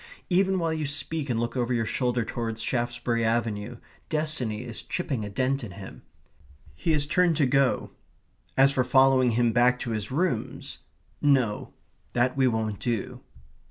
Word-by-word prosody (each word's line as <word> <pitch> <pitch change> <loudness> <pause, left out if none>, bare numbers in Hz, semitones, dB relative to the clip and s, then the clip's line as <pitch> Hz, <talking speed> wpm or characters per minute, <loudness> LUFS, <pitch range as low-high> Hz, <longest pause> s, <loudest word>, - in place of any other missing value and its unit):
Even 190 +1 +3
while 165 -2 0
you 155 -2 -2
speak 150 0 -3
and 115 -2 0
look 120 +1 -2
over 125 -1 0
your 115 -1 0
shoulder 125 0 0
towards 115 -1 -3
Shaftesbury 120 -1 -1
Avenue, 115 0 -1 0.3
destiny 150 -9 -1
is 120 -3 -6
chipping 145 -11 -3
a 105 - -5
dent 130 +5 0
in 100 -5 -7
him. 100 0 -10 0.7
He 165 - -1
has 145 -2 +2
turned 175 0 +2
to 145 - +3
go. 135 0 +1 0.7
As 135 +1 +6
for 130 -2 +1
following 130 0 +4
him 120 -1 +3
back 125 +2 +3
to 120 - -3
his 105 -2 -2
rooms, 130 -5 -2 0.4
no 130 -7 +1 0.4
that 125 +1 +2
we 135 -1 +3
won't 110 -4 -1
do. 115 -5 -3
125 Hz, 160 wpm, -26 LUFS, 115-140 Hz, 0.7 s, As